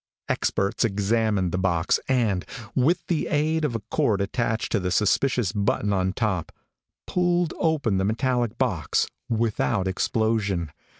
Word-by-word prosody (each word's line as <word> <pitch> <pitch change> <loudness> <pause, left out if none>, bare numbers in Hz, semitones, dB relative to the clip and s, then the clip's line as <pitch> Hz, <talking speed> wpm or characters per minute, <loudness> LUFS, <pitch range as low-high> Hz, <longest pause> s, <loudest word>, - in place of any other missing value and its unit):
Experts 100 0 0
examined 105 -3 +1
the 90 - -1
box, 90 -3 +1
and, 115 -8 +1 0.3
with 145 +7 +2
the 170 -3 -1
aid 155 +2 +1
of 140 -6 0
a 115 - -2
cord 105 -3 +2
attached 110 +3 -1
to 110 - +2
the 90 -1 -2
suspicious 105 +3 +2
button 105 0 0
on 95 -1 +1
top, 95 -6 -2 0.5
pulled 175 -2 +1
open 145 - +1
the - - +1
metallic 120 +1 0
box - - +1 0.2
without 110 -3 0
explosion. 100 -4 0
110 Hz, 135 wpm, -25 LUFS, 95-130 Hz, 0.5 s, with